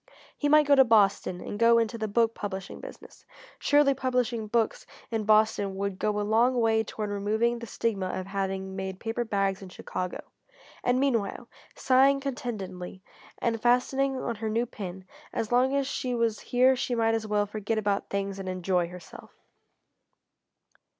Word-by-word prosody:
He 290 - -1
might 305 0 +6
go 285 - +4
to 270 -1 +8
Boston 200 -5 +2
and 205 - -6
go 230 0 +6
into 230 0 0
the 220 -1 -3
book 230 +2 +2
publishing 195 -3 -6
business. - - -12 0.4
Surely 290 -1 +4
publishing 250 -4 -1
books 225 0 0 0.2
in 220 -2 -1
Boston 215 -2 +3
would 195 -1 -3
go 210 -1 0
a - - 0
long 235 +4 +3
way 225 -1 +3
toward 210 -1 -5
removing 220 +4 0
the 235 - -8
stigma 200 -3 -2
of 185 0 -4
having 195 -1 -3
made 190 -1 -5
paper 230 +1 -2
bags 195 -3 -1
in 190 - -9
Chicago. 180 0 -5 0.6
And 245 +1 +2
meanwhile, 235 -4 0 0.3
sighing 270 +2 +4
contentedly, 200 -9 -5 0.3
and 230 -2 -1
fastening 265 +3 +2
on 235 -3 -3
her 220 +1 -3
new 230 +3 +1
pin, 190 -5 -8 0.3
as 225 - -3
long 255 +3 +3
as 280 -1 +1
she 255 -2 -2
was 230 -2 0
here 255 +2 +3
she 250 -1 -2
might 225 -1 +2
as 225 -1 -2
well 210 -1 +1
forget 215 +1 -3
about 205 -2 -1
things 195 0 -3
and 190 -1 -5
enjoy 180 -1 0
herself. 180 0 -12
220 Hz, 170 wpm, -27 LUFS, 195-245 Hz, 0.6 s, to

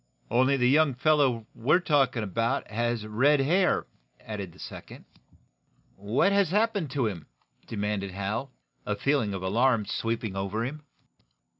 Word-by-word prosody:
"Only 130 +3 +3
the 125 -1 +3
young 145 0 +4
feller 135 -5 +2
we're 150 +9 +2
talkin' 140 -9 +1
about 115 +3 -1
has 120 0 -1
red 135 +8 +3
hair," 175 +7 +2 0.3
added 100 -4 -6
the - - -19
second. - - -10 0.9
"What 110 - +1
has 200 -3 +3
happened 205 -4 +1
to 135 -4 +1
him?" 95 -7 -4 0.4
demanded 105 -2 -2
Hal, 100 +8 -4 0.3
a - - -2
feeling 130 -8 0
of 95 - -5
alarm 115 +3 +2
sweeping 115 -3 -3
over 100 +4 -2
him. 150 +4 -6
120 Hz, 140 wpm, -27 LUFS, 105-145 Hz, 0.9 s, young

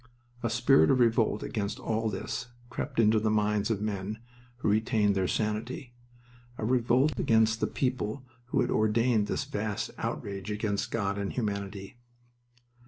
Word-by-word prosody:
A 115 - 0
spirit 120 +6 +4
of 135 -2 +4
revolt 115 -3 +3
against 100 -2 -3
all 110 0 -1
this 120 +4 -4 0.2
crept 130 +1 -3
into 110 -1 +5
the 110 0 +1
minds 105 0 +1
of 105 -2 -1
men 105 0 -3 0.4
who 120 - -2
retained 105 -1 +2
their 95 -1 +1
sanity 115 +5 -2 0.6
a - - -3
revolt 125 +4 +2
against 110 0 +3
the - - +1
people 130 -1 -2 0.2
who 120 - +1
had - - 0
ordained 110 0 +2
this - - -1
vast 105 0 -3
outrage 100 0 -4
against 105 0 -1
God 100 -3 -1
and 100 -1 -2
humanity. 100 -2 -4
110 Hz, 150 wpm, -29 LUFS, 105-115 Hz, 0.6 s, into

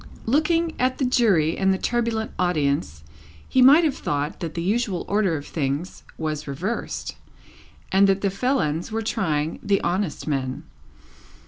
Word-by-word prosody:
Looking 320 +6 +2
at 255 +1 +1
the 270 - 0
Jury 205 -11 +3
and 190 0 +2
the 190 - +1
turbulent 230 0 -1
audience, 140 - 0 0.4
he 260 - +2
might 285 +7 +8
have 300 -4 +1
thought 145 +1 -3
that 165 -3 -5
the 170 - -2
usual 205 -1 -1
order 200 -5 +1
of 145 - -8
things 145 +3 -3 0.2
was 155 -2 -3
reversed, 180 - -4 0.8
and 195 +1 +5
that 195 0 +2
the 200 - +1
felons 195 - -1
were 225 +1 -2
trying 160 -9 -1
the 200 -1 +1
honest 180 -1 -2
men. 130 -3 -2
190 Hz, 150 wpm, -23 LUFS, 155-235 Hz, 0.8 s, might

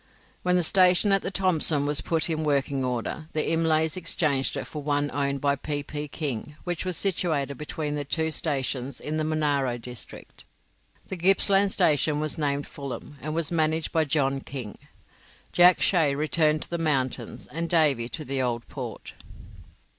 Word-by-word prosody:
When 180 0 +2
the 180 - +2
station 185 +3 +4
on 195 0 +4
the - - -3
Thomson 165 -6 +1
was 145 0 +1
put 165 -1 0
in 160 -2 -1
working 140 -2 0
order, 125 +5 -3
the 155 - 0
Imlays 160 -1 +2
exchanged 155 -6 0
it - - -4
for 150 - -7
one 145 0 0
owned 140 -1 -1
by 140 -1 +2
P. 145 +1 -3
P. 150 +1 -5
King, 145 -2 -4
which 175 0 -3
was 185 -2 0
situated 160 -7 -1
between 150 0 -4
their 145 -1 -2
two 160 +3 -1
stations 135 -4 -2
in 155 +1 -3
the 155 - 0
Monaro 145 -5 0
district. 120 0 -9 0.6
The 190 - -5
Gippsland 195 +2 +4
station 150 -2 +2
was 155 +1 -3
named 145 -1 0
Fulham, 140 +1 -8
and 155 +2 -4
was 165 -2 0
managed 160 -1 +1
by 160 -1 +2
John 135 -2 +1
King. 125 -8 -7 0.7
Jack 180 +1 +6
Shay 160 -7 +3
returned 155 +1 +2
to - - -12
the 170 - -2
mountains, 140 -5 -1
and 165 +1 -4
Davy 145 -9 +2
to 155 - -6
the 135 0 -1
Old 120 -2 -2
Port. - - -7
150 Hz, 170 wpm, -26 LUFS, 140-165 Hz, 0.7 s, Jack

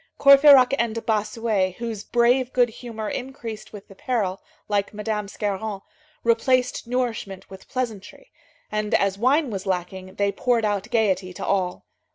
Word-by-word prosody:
Courfeyrac 275 -2 +7
and 230 -1 -1
Bossuet, 215 -3 0
whose 230 -3 -5
brave 245 +2 +2
good 245 -1 +3
humor 220 -1 -7
increased 235 -4 -6
with 205 -2 -11
the - - -14
peril, 195 -4 -2 0.3
like 205 0 -1
Madame 210 -1 -3
Scarron, 205 0 -3 0.4
replaced 245 +2 +1
nourishment 235 -6 -3
with 190 - -12
pleasantry, 250 - -5 0.4
and, 215 0 0
as 195 0 +1
wine 270 +3 +2
was 195 -1 -5
lacking, 185 +1 -4
they 200 0 +1
poured 235 0 +1
out 205 0 -1
gayety 195 -6 +1
to - - -6
all. 185 -2 -1
220 Hz, 145 wpm, -23 LUFS, 200-245 Hz, 0.4 s, Courfeyrac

